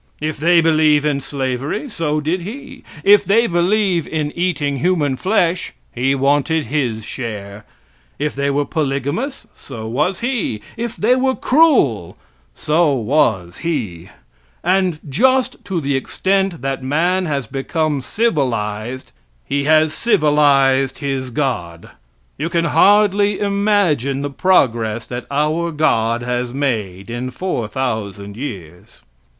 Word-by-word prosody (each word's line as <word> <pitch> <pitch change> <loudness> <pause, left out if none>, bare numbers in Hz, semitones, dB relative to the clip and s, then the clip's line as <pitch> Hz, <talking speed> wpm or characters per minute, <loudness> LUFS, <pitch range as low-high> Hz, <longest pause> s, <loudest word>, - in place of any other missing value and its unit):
If 155 +1 -3
they 170 +2 +4
believe 155 -2 +3
in 145 -2 0
slavery, 135 - -3
so 155 - -2
did 160 +5 -1
he; 265 +7 -9 0.2
if 205 0 +6
they 225 +4 +3
believe 180 -1 +1
in 155 -2 -2
eating 155 -6 -1
human 155 -4 +1
flesh, 185 +1 0 0.2
he 130 +3 +1
wanted 145 +3 +1
his 120 -5 -2
share; 105 -4 -7 0.5
if 150 +1 -2
they 140 +1 -1
were 145 +1 0
polygamous, 150 - -2
so 115 -5 -9
was 150 +11 -1
he; 240 - -1 0.2
if 235 0 -4
they 240 +4 +3
were 260 0 +1
cruel, 250 - +2 0.4
so 155 -1 +2
was 110 - 0
he. 105 - -4 0.5
And 185 -2 +1
just 255 - +1
to 190 -4 -2
the 140 -2 -1
extent 190 +3 -1
that 135 0 -2
man 175 +7 0
has 140 -4 -2
become 145 +4 -2
civilized, 125 - -2 0.3
he 140 0 -1
has 155 0 +4
civilized 140 - +3
his 135 -2 -3
god. 90 - -3 0.5
You 160 +3 -1
can 170 -1 0
hardly 205 +2 +4
imagine 200 - +1
the 145 - -3
progress 120 -10 +1
that 120 0 -6
our 155 +4 0
God 120 -7 +1
has 125 0 -2
made 110 -8 -2
in 120 +2 -4
four 130 - -3
thousand 105 -5 -4
years. 90 - -8
145 Hz, 130 wpm, -18 LUFS, 125-180 Hz, 0.5 s, if